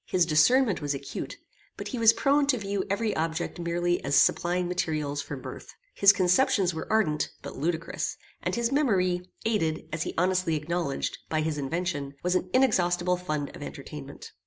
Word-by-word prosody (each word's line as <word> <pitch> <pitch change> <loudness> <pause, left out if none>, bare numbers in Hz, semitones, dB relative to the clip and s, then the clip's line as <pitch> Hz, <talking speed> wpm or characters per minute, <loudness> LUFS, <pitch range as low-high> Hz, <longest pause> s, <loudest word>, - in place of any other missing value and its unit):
His 180 -2 +2
discernment 200 - +4
was 145 -1 -1
acute, 140 0 -6 0.4
but - - -5
he 250 - -4
was 225 -1 +7
prone 280 +4 +2
to 270 -3 +3
view 200 -2 -2
every 210 +2 0
object 165 +2 -2
merely 175 +1 0
as 140 +1 0
supplying 175 +1 +3
materials 155 -5 -1
for - - -6
mirth. - - -9 0.2
His 200 0 +7
conceptions 185 0 +2
were 160 - -5
ardent 205 -9 +1
but - - -7
ludicrous, 165 +3 -2 0.2
and - - -1
his 235 +1 0
memory, 190 -11 +2 0.2
aided, 165 -9 0
as 160 - -2
he - - -3
honestly 180 -1 +1
acknowledged, 160 -1 -2
by 155 -1 0
his 155 -1 -2
invention, 145 -1 -3
was 180 0 +1
an 185 0 0
inexhaustible 180 -8 +2
fund 155 -5 -4
of - - -11
entertainment. - - -9
175 Hz, 170 wpm, -27 LUFS, 160-200 Hz, 0.4 s, was